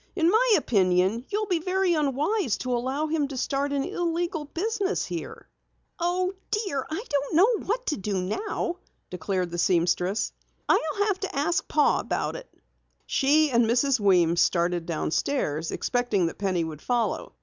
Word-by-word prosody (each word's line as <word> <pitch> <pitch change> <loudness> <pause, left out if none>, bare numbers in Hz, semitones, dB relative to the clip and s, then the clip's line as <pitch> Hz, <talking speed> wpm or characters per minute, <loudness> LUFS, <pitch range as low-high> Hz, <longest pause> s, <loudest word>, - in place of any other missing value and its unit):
"In 335 -1 +3
my 460 +2 +4
opinion 190 +2 +2
you'll 420 +1 -1
be 360 -4 0
very 370 +1 +1
unwise 300 - 0
to 255 - -4
allow 260 +5 -1
him 310 -2 0
to 275 -1 -7
start 275 +3 -1
an 280 -1 0
illegal 335 -1 -2
business 400 +5 -2
here." - - -7 0.5
"Oh, 365 +2 0 0.2
dear, 390 - -1
I 330 +9 -4
don't 285 +1 -1
know 420 +6 +3
what 485 +5 -1
to 300 - -1
do 195 0 -2
now," 345 - -3 0.3
declared 180 0 -2
the 175 - -4
seamstress. 180 +3 +1 0.3
"I'll 320 +6 +2
have 400 -3 0
to 390 - -5
ask 315 +5 0
Pa 300 - +3
about - - -2
it." - - -9 0.6
She 295 +2 +3
and 235 -1 +3
Mrs. 250 +3 +2
Weems 175 -4 +3
started 175 -1 +1
downstairs, 165 - -1
expecting 245 -7 0
that 165 - -4
Penny 185 -4 0
would 155 -2 -6
follow. 240 -2 -1
280 Hz, 160 wpm, -26 LUFS, -, 0.6 s, my